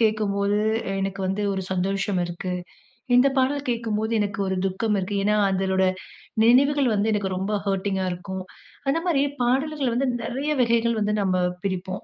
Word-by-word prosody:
கேக்கும்போது 205 -2 +1 0.4
எனக்கு 195 0 -3
வந்து 195 +2 -1
ஒரு 190 -1 -2
சந்தோஷம் 195 +1 0
இருக்கு. 175 +1 -4 0.6
இந்த 250 +3 +6
பாடல் 280 +2 +1
கேக்கும்போது 225 -2 -1
எனக்கு 205 -1 -2
ஒரு 190 0 -1
துக்கம் 205 +3 0
இருக்கு. 195 +2 -2
ஏன்னா 210 +1 +3 0.2
அதலோட 190 0 +1 0.6
நினைவுகள் 275 +3 +4
வந்து 210 +2 +1
எனக்கு 195 -3 -1
ரொம்ப 195 +3 -2
ஹர்டிங்கா 195 -1 0
இருக்கும்." 185 +1 -5 0.5
அந்த 280 +4 +2
மாரி 305 -6 +3 0.2
பாடல்கள் 270 +1 +1
வந்து 265 +2 +1
நிறைய 270 +6 -2
வகைகள் 235 -1 +2
வந்து 210 0 +1
நம்ம 185 -2 +1 0.3
பிரிப்போம். 185 -1 -3
205 Hz, 150 wpm, -24 LUFS, 190-240 Hz, 0.6 s, இந்த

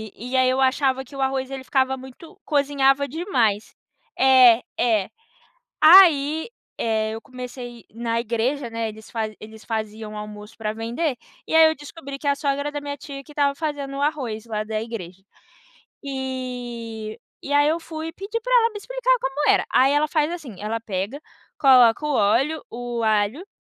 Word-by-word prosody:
e 250 +3 -3
aí 255 0 +4
eu 260 +1 +1
achava 265 0 +2
que 275 - -14
o 270 - -4
arroz 265 0 -1
ele 265 -1 -6
ficava 265 0 +1
muito 290 +9 -13
cozinhava 280 -1 +2
demais. 245 - -1 0.4
É, 255 -3 +7 0.2
é. 220 -5 +2 0.7
Aí, 320 -2 +7 0.3
eh, 220 -1 0
eu 225 - -6
comecei 250 -2 -9
na 230 +1 -1
igreja, 235 +3 -1
né, 230 0 -2
eles 215 0 -13
fazem 220 -2 -3
eles 220 0 -12
faziam 220 -1 -4
o 215 - -8
almoço 210 +1 -9
pra 215 -2 -3
vender. 240 +6 -2 0.3
E - - -5
aí, 320 0 +8
eu - - -2
descobri 285 -1 -9
que 285 - -3
é - - +5
a 280 - +1
sogra 285 0 -1
da 290 0 -5
minha 285 0 -5
tia 275 0 -9
que 300 - -14
estava 285 -1 +1
fazendo 285 -3 -4
o 280 - -4
arroz 255 -8 -2
lá, 215 -2 -2
da 215 0 -3
igreja. 195 -6 -7 0.8
Eh, 245 -5 -5 0.2
e 285 - -5
aí 290 +1 +4
eu 320 +2 +1
fui 320 -1 -6
e - - -7
pedi 405 +6 -5
pra - - -6
ela 460 0 +2
me 420 - -7
explicar - - 0
como 270 +3 +1
era. - - +3
Aí, 265 +2 +4
ela 295 +1 +2
faz 305 0 +1
assim, 290 - -8
ela 220 +2 -3
pega, 210 +5 -4 0.4
coloca 255 -1 +6
o 295 - 0
óleo, 255 +9 +2
o 240 0 -4
alho, 215 - +1
260 Hz, 185 wpm, -23 LUFS, 225-290 Hz, 0.8 s, aí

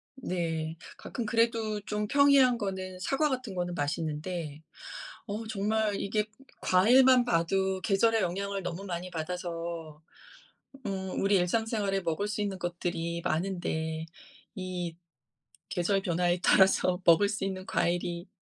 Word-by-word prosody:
네. 165 -8 -3 0.2
가끔 240 - -5
그래도 225 -1 +1
좀 210 0 -2
평이한 280 -3 +5
거는 190 -3 -4
사과 280 +10 +1
같은 255 -7 -3
거는 175 -1 -2
맛있는데 155 0 -3 0.7
어 215 +2 -4
정말 215 0 0
이게 210 +1 0 0.4
과일만 250 +7 +6
봐도 190 0 +1
계절의 220 +3 +3
영향을 195 +2 -2
너무 180 +3 -5
많이 180 -1 -4
받아서 165 -2 -5 0.8
음 190 -2 -3
우리 200 +1 +3
일상생활에 200 +1 +1
먹을 170 +4 -1
수 210 0 -3
있는 195 -2 -2
것들이 175 -1 -3
많은데 160 -2 -2 0.5
이 180 -3 -4 0.8
계절 180 +2 +1
변화에 175 0 +1
따라서 185 -1 +4
먹을 170 +4 +6
수 205 -2 -3
있는 190 -1 -3
과일이 175 0 -1
190 Hz, 265 characters per minute, -29 LUFS, 170-210 Hz, 0.8 s, 과일만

